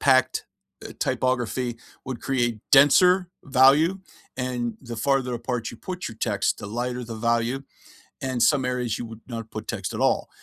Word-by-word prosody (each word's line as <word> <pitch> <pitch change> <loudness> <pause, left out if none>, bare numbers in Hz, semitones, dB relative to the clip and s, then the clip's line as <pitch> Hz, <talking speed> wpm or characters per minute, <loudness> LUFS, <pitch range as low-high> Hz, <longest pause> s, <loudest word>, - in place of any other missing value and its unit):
packed, 130 -1 +3 0.4
uh, - - -9
typography 125 -1 -1 0.3
would 130 -2 -5
create 120 -5 0
denser 180 +6 +6
value, 140 +7 +5 0.4
and 125 -3 -2
the 120 -3 -7
farther 130 0 +1
apart 120 -1 -3
you - - -11
put 180 +7 -5
your 110 - -10
text, 105 -3 0
the - - -7
lighter 120 +3 -3
the 115 0 -7
value, 115 +3 0 0.6
and 130 -2 -2
some 140 -4 +3
areas, 125 -3 -1
you 120 - -4
would 115 -1 -10
not 115 -3 -6
put 110 0 -6
text - - -3
at - - -4
all, - - +2
125 Hz, 165 wpm, -25 LUFS, 115-135 Hz, 0.6 s, denser